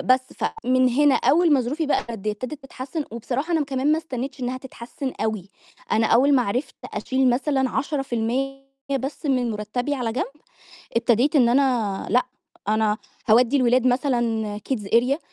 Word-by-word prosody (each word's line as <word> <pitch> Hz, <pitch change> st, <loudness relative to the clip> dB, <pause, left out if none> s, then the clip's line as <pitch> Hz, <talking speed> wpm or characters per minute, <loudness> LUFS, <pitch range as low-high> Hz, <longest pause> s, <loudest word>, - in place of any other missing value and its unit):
بس 255 Hz, 0 st, +4 dB
فمن 255 Hz, -, +1 dB
هنا 280 Hz, +3 st, +4 dB
أول 315 Hz, +6 st, +3 dB
ما 275 Hz, -, +5 dB
ظروفي 290 Hz, +6 st, -2 dB
بقى -, -, +2 dB
ابتدِت 215 Hz, +4 st, -4 dB
تتحسن 270 Hz, +4 st, -5 dB
وبصراحة 255 Hz, +8 st, -3 dB
أنا 325 Hz, -, +2 dB
م -, -, +1 dB
كمان 275 Hz, +1 st, 0 dB
ما 315 Hz, -, +2 dB
استنيتش 270 Hz, -3 st, -5 dB
إنها 255 Hz, +1 st, -2 dB
تتحسن 260 Hz, +1 st, -7 dB
أوي، 215 Hz, -3 st, -2 dB, 0.4 s
أنا 225 Hz, 0 st, +3 dB
أول 275 Hz, +6 st, +4 dB
ما 255 Hz, -, +4 dB
عرفت 250 Hz, +6 st, -2 dB
أشيل 260 Hz, +5 st, 0 dB
مثلًا 265 Hz, +1 st, +1 dB
10% 270 Hz, -1 st, -2 dB, 0.4 s
بس 285 Hz, +4 st, -5 dB
من 255 Hz, -3 st, +1 dB
مُرتبي 220 Hz, +6 st, -2 dB
على 245 Hz, -4 st, -2 dB
جنب، 255 Hz, -, 0 dB, 0.7 s
ابتديت 240 Hz, +5 st, +3 dB
إن 245 Hz, -4 st, +5 dB
أنا 240 Hz, -6 st, +1 dB
لأ 250 Hz, -, +4 dB, 0.5 s
أنا 215 Hz, 0 st, +2 dB, 0.3 s
هاودّي 240 Hz, +5 st, +5 dB
الولاد 255 Hz, -1 st, +3 dB
مثلًا 240 Hz, -5 st, 0 dB
kids 260 Hz, -, +1 dB, 0.2 s
area 250 Hz, +5 st, +3 dB
255 Hz, 155 wpm, -23 LUFS, 235-275 Hz, 0.7 s, ما